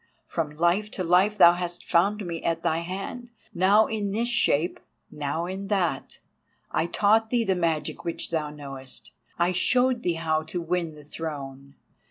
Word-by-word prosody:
From 165 Hz, -3 st, -2 dB
Life 175 Hz, +6 st, +2 dB
to 185 Hz, -, -2 dB
Life 185 Hz, +5 st, +3 dB
thou 175 Hz, -3 st, +8 dB
hast 175 Hz, 0 st, -4 dB
found 200 Hz, +4 st, +2 dB
me 170 Hz, -2 st, -4 dB
at 165 Hz, 0 st, -1 dB
thy 160 Hz, -, +1 dB
hand, 195 Hz, +8 st, -6 dB, 0.2 s
now 200 Hz, +4 st, +5 dB
in 210 Hz, -2 st, -2 dB
this 230 Hz, +4 st, -1 dB
shape, 175 Hz, -8 st, +2 dB, 0.3 s
now 150 Hz, +2 st, -3 dB
in 190 Hz, +2 st, -5 dB
that. 180 Hz, -9 st, -1 dB, 0.5 s
I 165 Hz, -, 0 dB
taught 220 Hz, +4 st, +3 dB
thee 240 Hz, -1 st, +2 dB
the 195 Hz, -, +1 dB
magic 165 Hz, -4 st, -1 dB
which 170 Hz, -1 st, -4 dB
thou 155 Hz, -2 st, -1 dB
knowest; 135 Hz, -3 st, -8 dB, 0.3 s
I 175 Hz, +1 st, +2 dB
showed 250 Hz, +6 st, +2 dB
thee 175 Hz, -5 st, 0 dB
how 160 Hz, -1 st, 0 dB
to 160 Hz, +3 st, -5 dB
win 170 Hz, -1 st, -2 dB
the 150 Hz, -, -13 dB
Throne! 140 Hz, -3 st, -7 dB
175 Hz, 170 wpm, -26 LUFS, 160-200 Hz, 0.5 s, thou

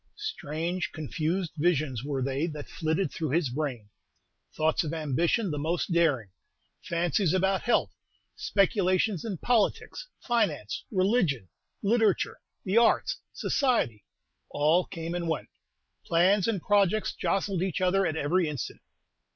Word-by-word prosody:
Strange, 175 Hz, -, -3 dB
confused 160 Hz, +3 st, -2 dB
visions 150 Hz, -7 st, +1 dB
were 140 Hz, -2 st, -2 dB
they 135 Hz, +4 st, -1 dB
that 150 Hz, -3 st, -7 dB
flitted 160 Hz, +3 st, -1 dB
through 160 Hz, -3 st, -3 dB
his 150 Hz, -2 st, +1 dB
brain. 130 Hz, -6 st, -3 dB, 0.6 s
Thoughts 155 Hz, +2 st, +1 dB
of 160 Hz, +1 st, -3 dB
ambition 165 Hz, -, 0 dB
the 150 Hz, -, -3 dB
most 165 Hz, +5 st, -1 dB
daring, 145 Hz, -, +2 dB, 0.5 s
fancies 170 Hz, +1 st, +1 dB
about 190 Hz, +1 st, +2 dB
health, 240 Hz, -, +1 dB, 0.4 s
speculations 200 Hz, -, +1 dB
in 215 Hz, -5 st, -4 dB
politics, 245 Hz, -, 0 dB
finance, 185 Hz, -, -1 dB
religion, 185 Hz, -, +1 dB, 0.3 s
literature, 215 Hz, -1 st, +2 dB, 0.2 s
the 195 Hz, +3 st, 0 dB
arts, 235 Hz, -, +3 dB
society, 235 Hz, -, 0 dB, 0.5 s
all 155 Hz, +5 st, +2 dB
came 165 Hz, -1 st, -5 dB
and 175 Hz, -1 st, -2 dB
went. 160 Hz, -, -2 dB, 0.5 s
Plans 185 Hz, +4 st, +3 dB
and 205 Hz, -7 st, -1 dB
projects 205 Hz, 0 st, +2 dB
jostled 195 Hz, -2 st, -1 dB
each 185 Hz, -3 st, -1 dB
other 185 Hz, +1 st, +2 dB
at 160 Hz, -, 0 dB
every 165 Hz, +3 st, +1 dB
instant. 145 Hz, -5 st, -5 dB
170 Hz, 125 wpm, -28 LUFS, 150-195 Hz, 0.6 s, arts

